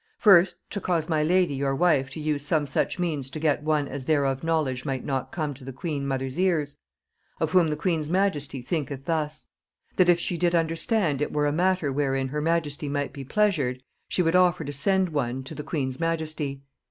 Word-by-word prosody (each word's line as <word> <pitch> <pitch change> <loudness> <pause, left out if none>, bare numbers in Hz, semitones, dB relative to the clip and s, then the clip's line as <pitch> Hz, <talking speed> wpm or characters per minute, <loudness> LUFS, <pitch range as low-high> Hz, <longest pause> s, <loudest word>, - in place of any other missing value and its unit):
First, 190 -4 +6 0.2
to 200 - -2
cause 170 -4 0
my 160 -3 +1
lady 175 0 +2
your 135 0 -1
wife 140 -5 +2
to 140 - -8
use 150 -2 -1
some 150 0 +1
such 140 - -1
means 155 -7 -2
to 145 - -6
get 150 -2 +1
one 150 -2 +1
as 135 -1 -6
thereof 140 -3 +1
knowledge 155 -6 0
might 135 -3 -3
not 130 -2 -2
come 155 -4 -2
to 135 0 -14
the 135 - -6
queen 140 0 -4
mother's 135 +2 -2
ears, 155 -6 0 0.6
of 160 -1 0
whom 180 -2 +5
the 150 - -1
queen's 160 -3 -1
majesty 150 -8 0
thinketh 140 -2 -3
thus: 155 -2 -2 0.5
That 180 -1 +5
if 175 -1 +5
she 170 0 -2
did 175 -1 +2
understand 165 - +1
it 150 - -1
were 150 0 +1
a 145 - +2
matter 180 -4 +1
wherein 135 -1 0
her 150 +2 -2
majesty 155 -2 -1
might 145 0 -2
be 140 - -7
pleasured, 140 -8 0 0.2
she 180 - +1
would 165 +1 +2
offer 180 -2 +4
to 145 -1 -5
send 190 +5 +2
one 130 -4 -2
to 130 - -8
the - - -6
queen's 135 -4 -3
majesty. 155 -4 -2
150 Hz, 205 wpm, -26 LUFS, 140-170 Hz, 0.6 s, First